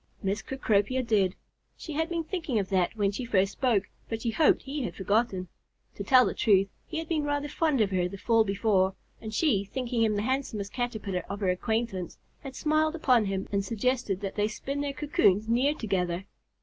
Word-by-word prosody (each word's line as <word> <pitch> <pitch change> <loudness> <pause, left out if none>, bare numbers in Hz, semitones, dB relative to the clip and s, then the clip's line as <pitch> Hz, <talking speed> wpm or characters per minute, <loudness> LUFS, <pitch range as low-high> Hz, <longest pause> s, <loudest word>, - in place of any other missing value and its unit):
Miss 200 +2 -1
Cecropia 255 -1 0
did. 200 -5 +2 0.4
She 315 - -7
had 320 +3 -1
been 335 -1 -1
thinking 315 - -2
of 195 -3 -1
that 185 +1 +1
when 200 -2 +1
she 230 +6 -4
first 195 -4 +2
spoke, 235 -7 +1 0.3
but 225 - -2
she 230 - 0
hoped 310 +7 +3
he 280 +2 -4
had 240 - -4
forgotten. 195 -1 0 0.5
To 200 - -6
tell 255 +3 +6
the - - -1
truth, 195 -2 +3 0.2
he 320 - -5
had 325 0 -3
been 315 -2 0
rather 290 0 -1
fond 295 -4 +1
of 200 -2 +2
her 180 -1 +1
the 195 - -8
fall 225 +2 +3
before, 195 -2 +1 0.3
and 220 - -6
she, 215 - +2
thinking 245 +2 -2
him 220 -2 +3
the 205 - -1
handsomest 230 -6 -2
Caterpillar 220 -7 -2
of 200 +1 -4
her 190 - +1
acquaintance, 210 -1 -2 0.2
had 265 -1 -9
smiled 310 +1 +1
upon 250 -8 +3
him 195 -1 -2
and 200 -1 +1
suggested 225 -1 -1
that 195 -1 -3
they 210 0 +1
spin 275 +6 -4
their 285 -1 -1
cocoons 275 - +2
near 255 +6 +2
together. 185 - -2
220 Hz, 200 wpm, -28 LUFS, 195-270 Hz, 0.5 s, tell